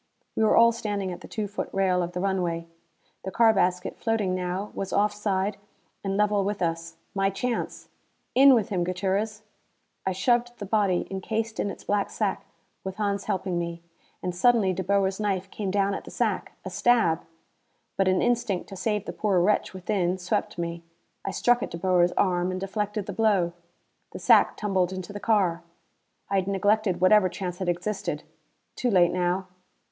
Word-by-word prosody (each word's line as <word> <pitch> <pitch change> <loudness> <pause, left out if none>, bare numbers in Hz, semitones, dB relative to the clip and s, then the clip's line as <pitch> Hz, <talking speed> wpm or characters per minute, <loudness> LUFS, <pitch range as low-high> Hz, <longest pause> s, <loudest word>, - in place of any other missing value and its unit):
We - - 0
were 215 - +4
all 235 0 +7
standing 205 -4 -3
at 175 - -8
the - - -10
two 215 -2 -3
foot 205 - -4
rail 185 -2 +2
of 175 0 -3
the 180 - -3
runway. 180 -3 -1 0.6
The 190 - -3
car 225 +3 +4
basket, 180 -2 0
floating 220 -5 0
now, 185 +3 -3
was 195 - -4
off 210 +1 +2
side 200 -1 -1 0.5
and 195 0 -1
level 210 -1 +2
with 205 +1 -2
us. 165 -1 -2 0.2
My 195 0 +2
chance! 235 +5 -3 0.5
"In 270 +1 +8
with 220 -4 0
him, 180 -3 0
Gutierrez." 195 +4 -1 0.6
I 190 - 0
shoved 240 +5 +1
the 205 - -6
body, 200 -3 +1
encased 220 +3 -3
in 205 - 0
its - - -8
black 205 -1 0
sack, - - -2 0.4
with 190 -1 -5
Hans 200 -1 -1
helping 185 -2 -1
me. 170 0 -5 0.4
And 180 - -2
suddenly 210 -1 +4
De 190 - -3
Boer's 195 +1 +1
knife 195 -2 -1
came 205 -3 -3
down 200 +1 +1
at - - -4
the - - -10
sack! - - -1
A - - -5
stab. 225 -10 +3 0.7
But 195 - +2
an 185 0 +3
instinct 230 -6 0
to 195 - -8
save 210 +1 -1
the - - -5
poor 200 -4 +1
wretch 200 +4 +2
within 185 -1 -1
swept 180 -1 -2
me. 170 0 -3 0.4
I - - -3
struck 245 +5 +2
at - - -3
De 170 - -6
Boer's 180 0 +3
arm 180 -2 +1
and 185 0 -3
deflected 205 +1 -3
the 200 - -5
blow. 195 -5 +2 0.6
The - - -5
sack - - +5
tumbled 190 -4 0
into 185 +1 -6
the 205 - -5
car. 195 -7 +2 0.7
I 195 - 0
had 190 -1 0
neglected 200 -1 +1
whatever 185 0 +5
chance 180 -1 -5
had 185 -2 -1
existed. 185 +4 -2 0.5
Too 250 - 0
late 180 -5 +4
now! 180 +1 0
195 Hz, 185 wpm, -26 LUFS, 180-210 Hz, 0.7 s, In